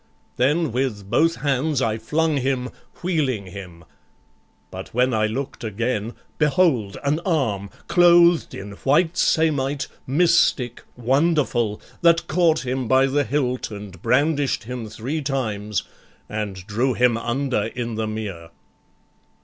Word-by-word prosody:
Then 145 +4 +2
with 110 -5 -2
both 165 +7 +3
hands 145 0 0
I 110 -3 0
flung 155 +6 0
him, 130 -1 -1 0.3
wheeling 140 - 0
him; 90 -3 -10 0.9
But - - -9
when 125 +1 +2
I 110 -1 +2
look'd 130 +5 -5
again, 115 +1 -2 0.3
behold 150 - +2
an 145 +3 +1
arm, 130 - -1 0.2
Clothed 175 -1 +5
in 100 +1 -7
white 160 +5 +2
samite, 145 -5 +1 0.2
mystic, 145 -5 +2
wonderful, 130 -4 +1 0.2
That 170 -1 +4
caught 160 -4 +2
him 130 -1 -2
by 130 +3 +4
the 140 +2 +1
hilt 130 -1 -1
and 100 -4 -9
brandish'd 140 +2 +1
him 120 -1 -6
Three 125 +9 -4
times, 105 -7 -2 0.4
and 100 -4 -5
drew 120 +5 0
him 125 -1 +3
under 120 -1 -1
in 120 0 -4
the 110 0 -2
mere." 100 -7 -5
130 Hz, 125 wpm, -22 LUFS, 110-150 Hz, 0.9 s, Clothed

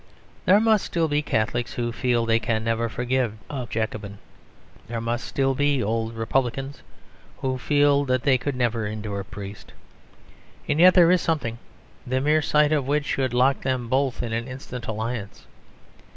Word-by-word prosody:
There 195 +3 +6
must 220 -2 +3
still 165 -2 0
be 145 0 +1
Catholics 120 -2 -1
who 120 -1 -2
feel 120 0 0
they 115 0 +3
can 110 -1 -1
never 115 0 0
forgive 125 +1 -1 0.2
a 130 -4 -4
Jacobin. 110 -2 -3 0.7
There 115 0 -3
must 120 +2 -3
still 135 -1 +1
be 145 -1 +1
old 115 +2 -2
Republicans 135 +4 -2 0.6
who 130 -1 -2
feel 145 0 +3
that 130 -2 0
they 130 -3 +3
could 140 +2 -3
never 120 -3 0
endure 105 -1 -4
a - - -4
priest. 100 +1 -9 0.9
And 150 +1 0
yet 180 +2 +7
there 175 -2 +7
is 180 - +3
something, 120 -8 -1 0.5
the 130 +1 0
mere 150 +3 +3
sight 150 0 +3
of 145 -4 +1
which 145 +1 +1
should 130 -3 -1
lock 130 +2 +3
them 130 -3 -2
both 130 -1 0
in 115 -2 -3
an 115 +1 -2
instant 130 -2 -8
alliance. 110 -1 -4
125 Hz, 170 wpm, -24 LUFS, 115-140 Hz, 0.9 s, yet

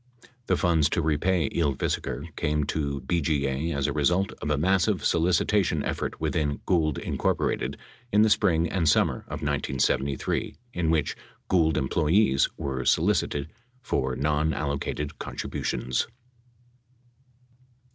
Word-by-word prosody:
The - - +2
funds 80 -4 +3
to - - +3
repay 80 +1 +1
Ylvisaker 75 0 -2
came 75 -1 0
to 70 -2 -2
BGA 75 -1 0
as 70 -1 0
a - - 0
result 95 +4 +1
of 75 - -3
a 75 - +2
massive 90 +3 +2
solicitation 85 -1 +2
effort - - -3
within 75 -3 -1
Gould, 80 -6 +1
Inc., - - -1 0.4
in 105 +1 +5
the 110 - +4
spring 85 -4 +3
and 85 -4 +1
summer - - +3
of 75 +1 -6
1973 70 -1 -1 0.2
in 85 -2 0
which 75 -3 +1 0.3
Gould 80 -4 +3
employees 75 +2 +2
were 65 -2 -3
solicited 80 -4 +1 0.3
for 65 - -1
non 75 +2 0
allocated 70 0 -3
contributions. 65 +1 -2
75 Hz, 120 wpm, -26 LUFS, 70-85 Hz, 0.4 s, in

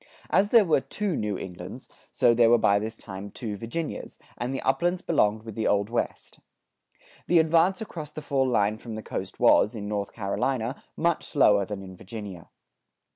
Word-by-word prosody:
As 195 +5 +3
there 230 -3 +6
were 160 -5 +3
two 205 +1 -3
New 105 -5 -2
Englands, 90 +7 -8 0.2
so 120 - +3
there 115 -1 +5
were 120 - +6
by 100 -2 +3
this 110 +2 -5
time 100 0 -8
two 105 0 -5
Virginias, 115 +10 -5 0.2
and 120 +2 -3
the 135 - -2
uplands 175 +7 0
belonged 110 -9 +2
with 110 -1 -8
the 110 +1 -1
Old 100 +2 +1
West. 120 - -3 0.9
The 175 - +4
advance 165 +5 +3
across 160 -9 -7
the 155 - -8
fall 135 -2 +1
line 105 -2 +1
from 115 -2 -7
the 110 - -6
coast - - -6
was, 105 - +5
in 105 -2 -5
North 100 -1 -3
Carolina, 115 +4 -2 0.2
much 170 0 +1
slower 105 -8 +4
than 100 -1 -6
in 95 -1 -10
Virginia. 100 -3 -9
115 Hz, 180 wpm, -26 LUFS, 105-155 Hz, 0.9 s, there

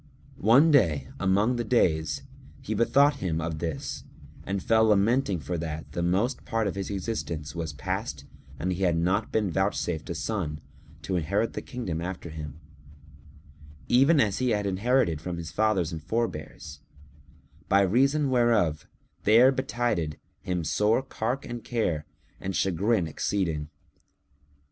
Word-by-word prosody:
One 135 +10 +6
day, 80 - +3
among 100 +6 +2
the 120 - -1
days, 105 0 +1 0.4
he 125 -5 -4
bethought 140 +6 +4
him 85 - -2
of 80 -1 -3
this 80 -4 -4 0.4
and 100 0 -2
fell 110 -1 +4
lamenting 105 -1 +2
for 85 +2 -4
that 80 -1 -5
the 85 - -3
most 95 +9 0
part 115 -1 -1
of 100 - -1
his 100 -1 -4
existence 90 -7 -4
was 85 -2 -4
past 95 - -4 0.3
and 90 +3 -1
he 90 - -5
had 85 -3 +2
not 95 +6 0
been 105 -4 0
vouchsafed 90 -3 -1
a 85 - -3
son, 80 -6 -3 0.4
to 90 +6 -1
inherit 100 +7 0
the - - -4
kingdom 115 - -4
after 90 -2 -5
him, 75 -1 -7 1.3
even 140 +6 +5
as 105 -6 +2
he 130 -1 +1
had 105 -3 0
inherited 100 - +1
it - - -17
from 85 +1 -4
his 85 -1 -6
fathers 105 -6 +1
and 80 -2 -5
forebears; 80 -6 -4 0.9
by 100 +1 +5
reason 135 +8 +2
whereof 115 -11 +2 0.3
there 115 +5 +6
betided 120 - -1 0.2
him 90 -2 -2
sore 105 - +2
cark 125 +1 -3
and 120 -1 -6
care 85 -11 -1 0.3
and 95 0 -4
chagrin 95 +2 +1
exceeding. 80 -2 -2
95 Hz, 150 wpm, -27 LUFS, 85-115 Hz, 1.3 s, One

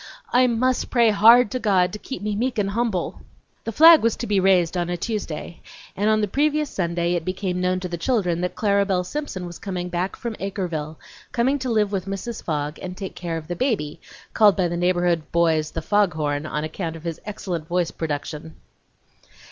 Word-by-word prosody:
I 250 +1 +5
must 250 +2 0
pray 235 -3 +4
HARD 225 +3 +6
to 255 - -2
God 190 -5 +2
to 210 - -5
keep 265 -1 -7
me 210 -1 -1
meek 240 +3 -1
and 200 -1 0
humble!" 215 -5 -1
III - - -19 0.4
The 225 - -2
flag 325 +6 +8
was 230 -1 +2
to 240 - -5
be 205 -3 +1
raised 185 -3 +3
on 175 -1 -1
a 175 - -2
Tuesday, 175 -5 -5 0.3
and 205 +2 +1
on 215 0 +3
the 210 - +1
previous 300 +5 0
Sunday 170 -1 -1
it 175 -2 -1
became 185 0 -2
known 185 0 +1
to 185 - -3
the 170 -1 -5
children 180 -5 0
that 180 - -2
Clara 200 -2 +2
Belle 190 -2 0
Simpson 190 -4 -5
was 175 -1 -9
coming 180 -2 -4
back 180 +2 -2
from 235 -2 -5
Acreville, 175 -6 -4 0.4
coming 260 +4 +1
to 260 -1 -3
live 215 -3 +1
with 195 -2 -3
Mrs. 195 +4 -5
Fogg 150 -1 -3
and 185 0 -6
take 195 -2 -6
care 170 -2 -4
of 155 -1 -8
the 175 - -3
baby, 190 - -1 0.3
called 210 -3 +5
by 185 -2 +2
the 175 - -3
neighborhood 175 -2 +1
boys 160 -2 +2
"the 165 - -5
Fogg 205 -2 +2
horn," 145 -1 -2
on 150 0 -3
account 165 +1 -4
of 160 - -11
his 165 -2 -5
excellent 180 -6 -5
voice 175 -1 0
production. 155 0 -5
185 Hz, 210 wpm, -23 LUFS, 170-215 Hz, 0.4 s, flag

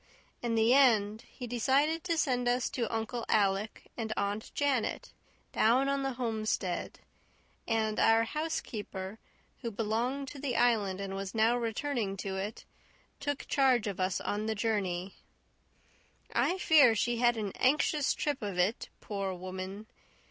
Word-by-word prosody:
In 235 -1 -1
the 225 +2 +4
end 220 -6 +4
he 250 - -8
decided 270 +7 +1
to 335 -2 0
send 250 -5 +1
us 245 0 +1
to 235 -4 -2
Uncle 225 +1 -2
Alec 200 0 +1
and 225 -2 -4
Aunt 200 +2 -2
Janet 280 -5 0 0.4
down 250 +5 +3
on 275 0 0
the 270 -1 -1
homestead; 220 -6 -2 0.7
and 220 -2 0
our 225 0 +5
housekeeper, 220 -8 -4 0.4
who 235 - -3
belonged 230 +6 -1
to 285 - -9
the 265 -3 -2
Island 215 -6 +2
and 195 -1 -4
was 195 +1 -5
now 225 +2 +4
returning 230 -3 -2
to 190 0 -4
it, 200 +3 -5 0.5
took 285 0 -3
charge 260 -5 +3
of 200 -2 -4
us 185 0 0
on 210 +1 -2
the 220 - 0
journey. 195 -4 -1 1.2
I 365 - +2
fear 300 -10 +6
she 240 +2 0
had 240 0 +3
an 205 -3 -2
anxious 295 +2 +2
trip 290 -2 -2
of 200 -4 -4
it, 185 +6 0
poor 195 -2 -3
woman! 185 +3 -6
225 Hz, 150 wpm, -31 LUFS, 205-255 Hz, 1.2 s, fear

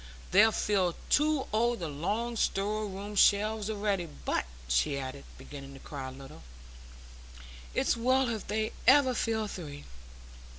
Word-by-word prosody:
They 210 +4 +7
fill 195 -5 +1 0.2
two 300 -2 +3
o' 235 +2 +2
the 175 -7 -5
long 210 +11 -2
store 210 0 0
room 200 +2 -7
shelves 210 +1 +3
a'ready; 200 -4 -1 0.2
but," - - 0 0.2
she 65 - +1
added, 135 +1 -6
beginning 140 -1 -10
to - - -11
cry 135 -2 -7
a - - -7
little, 135 +1 -12 1.3
"it's - - +2
well 255 +3 +2
if 220 -3 -4
they 215 +1 -1 0.2
ever 260 -1 +6
fill 220 -2 -1
three. 145 -7 -8
205 Hz, 140 wpm, -30 LUFS, 150-225 Hz, 1.3 s, They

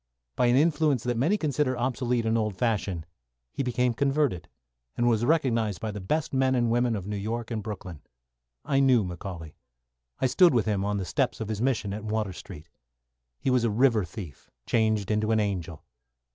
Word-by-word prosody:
By 125 - +2
an 120 - +4
influence 150 -4 +2
that 120 -1 -1
many 155 - +2
consider 145 -6 0
obsolete 125 -1 0
and 110 0 +1
old 105 -3 0
fashioned, 95 -7 -1 0.5
he - - -2
became 125 -1 +1
converted, 140 - 0 0.5
and 120 - +2
was 115 -1 +2
recognised 115 - +1
by 110 - -3
the 105 -1 -6
best 150 +12 -1
men 130 0 +2
and 120 -2 +1
women 120 -1 +2
in 100 -2 -5
New 105 - -3
York 115 +4 -4
and 110 -2 -2
Brooklyn. 95 -7 -7 0.6
I 135 - +2
knew 130 -5 +4
McCauley. 90 -3 -7 0.7
I - - +1
stood 155 +4 +5
with 115 - +2
him 105 -3 0
on 105 0 -1
the 95 - -3
steps 125 +3 -1
of 110 -2 -4
his 110 -1 -3
mission 120 -6 0
in 105 +1 -6
Water 105 -3 -1
Street. 85 -3 -11 0.7
He 130 - -1
was 125 -2 +3
a 115 - +2
river 115 -1 +3
thief 90 - -9 0.2
changed 110 -3 +1
into 105 0 +1
an 110 -1 +3
angel. 90 -6 -3
115 Hz, 190 wpm, -27 LUFS, 105-130 Hz, 0.7 s, stood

